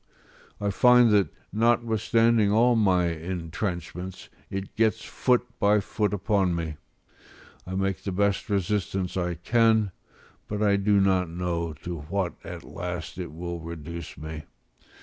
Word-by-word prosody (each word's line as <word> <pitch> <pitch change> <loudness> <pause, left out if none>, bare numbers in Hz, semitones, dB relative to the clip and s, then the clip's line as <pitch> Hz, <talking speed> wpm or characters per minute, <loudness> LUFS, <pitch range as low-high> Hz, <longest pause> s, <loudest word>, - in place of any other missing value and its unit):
I 100 0 0
find 125 +1 +6
that, 100 -6 +4 0.2
notwithstanding 115 -1 +3
all 120 +3 +4
my 95 -5 +3
entrenchments, 90 +2 -5 0.2
it 95 0 -5
gets 110 0 +1
foot 125 -1 +1
by 105 +1 +4
foot 105 +1 -1
upon 100 -3 +1
me: 80 -3 -4 0.9
I 95 - -4
make 95 0 -1
the 100 - -3
best 100 +3 0
resistance 95 -2 -1
I 90 -2 -1
can, 110 +3 +3 0.6
but 105 0 -2
I 100 -1 +4
do 100 0 +3
not 95 -2 +2
know 85 -1 -2
to 85 -2 -4
what 85 +4 -2
at - - -8
last 90 -1 -6
it 85 -3 -5
will 85 +2 -5
reduce 85 0 -7
me. 80 0 -7
95 Hz, 135 wpm, -26 LUFS, 85-105 Hz, 0.9 s, find